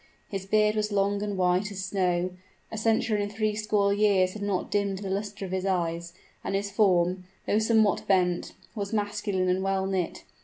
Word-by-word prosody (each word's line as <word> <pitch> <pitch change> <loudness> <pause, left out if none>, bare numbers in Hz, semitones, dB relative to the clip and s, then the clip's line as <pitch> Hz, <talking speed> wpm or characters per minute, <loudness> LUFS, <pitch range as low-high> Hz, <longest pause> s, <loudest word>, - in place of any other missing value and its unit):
His 195 -1 -5
beard 210 +1 +3
was 210 0 0
long 200 0 +1
and 205 -1 -2
white 180 +3 +2
as 190 -1 -4
snow; 185 -2 0 0.4
a 220 - -5
century 225 -1 +2
and 205 0 -3
three 215 0 0
score 210 -2 +1
years 200 -3 +3
had 215 - -8
not 200 -2 -2
dimmed 200 -1 0
the 195 -1 -5
luster 200 0 -3
of 185 - -7
his 190 0 -1
eyes; 170 -3 -1 0.3
and 195 - -2
his 200 0 -2
form, 185 -3 +2 0.2
though 210 - +2
somewhat 220 -2 +2
bent, 180 -3 +1 0.2
was 205 -2 -4
masculine 205 -3 -1
and 185 +1 +1
well 195 0 0
knit. 190 -3 -2
200 Hz, 190 wpm, -27 LUFS, 185-210 Hz, 0.4 s, beard